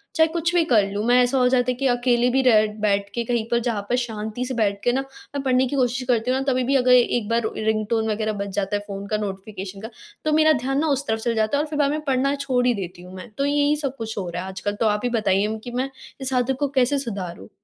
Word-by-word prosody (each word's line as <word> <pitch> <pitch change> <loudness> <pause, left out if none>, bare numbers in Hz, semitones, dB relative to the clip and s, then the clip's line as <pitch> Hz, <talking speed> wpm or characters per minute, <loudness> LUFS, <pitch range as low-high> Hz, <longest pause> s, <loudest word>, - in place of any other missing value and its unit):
चाहे 320 0 +5
कुछ 340 +1 -1
भी 345 - +5
कर 220 -7 +4
लूँ, 205 +1 -2
मैं 245 +1 +4
ऐसा 245 +2 +1
हो 250 - +4
जाता 250 -1 +2
है - - -1
कि 270 0 +1
अकेले 245 0 +2
भी 265 +2 +2
रह 215 -4 +5 0.2
बैठ 200 -1 +1
के 235 - 0
कहीं 235 -1 0
पर 235 - +2
जहाँ 220 -4 -1
पर 245 - +2
शांति 225 0 -3
से 260 - -4
बैठ 205 -4 0
के 245 - +3
ना 260 +2 0
मैं 285 +1 -8
पढ़ने 260 0 +3
की 280 - -3
कोशिश 255 -1 +1
करती 245 0 +1
हूँ 260 - +1
ना - - -2
तभी 255 0 +1
भी 270 +3 +1
अगर 250 -1 +3
एक 240 -3 +3
बार 230 +1 +2 0.2
रिंगटोन 220 +1 0
वग़ैरह 215 0 -1
बज 200 - -3
जाता 200 0 -1
है - - 0
फ़ोन 200 -1 -6
का 215 - 0
नोटिफ़िकेशन 195 -1 -6
का 225 - -6 0.4
तो 310 - +2
मेरा 310 0 +5
ध्यान 270 +1 0
ना 320 - +1
उस 280 - -5
तरफ 220 0 0
चला 235 +1 -1
जाता 220 +5 +1
है 295 - +1
और 310 - -7
फिर 300 - -3
बाद 285 -1 +3
में 305 +1 -2
पढ़ना 270 +1 +1
छोड़ 260 -3 0
ही 245 - +4
देती 180 -4 -6
हूँ 180 +1 -12
मैं। 185 +6 -9
तो 280 - +1
यही 290 +1 +2
सब 275 0 -3
कुछ 225 -1 -5
हो 185 -3 -3
रहा 175 +1 -4
है - - -7
आजकल, 195 +2 -3
तो 225 - -1
आप 210 -1 +1
ही 245 - +1
बताइए 210 -1 +1
कि 245 - -7
मैं 255 +2 -2 0.3
इस 265 0 -3
आदत 250 +1 +1
को 285 - +1
कैसे 270 0 +2
सुधारूँ? 195 -9 -6
245 Hz, 285 wpm, -23 LUFS, 215-265 Hz, 0.4 s, चाहे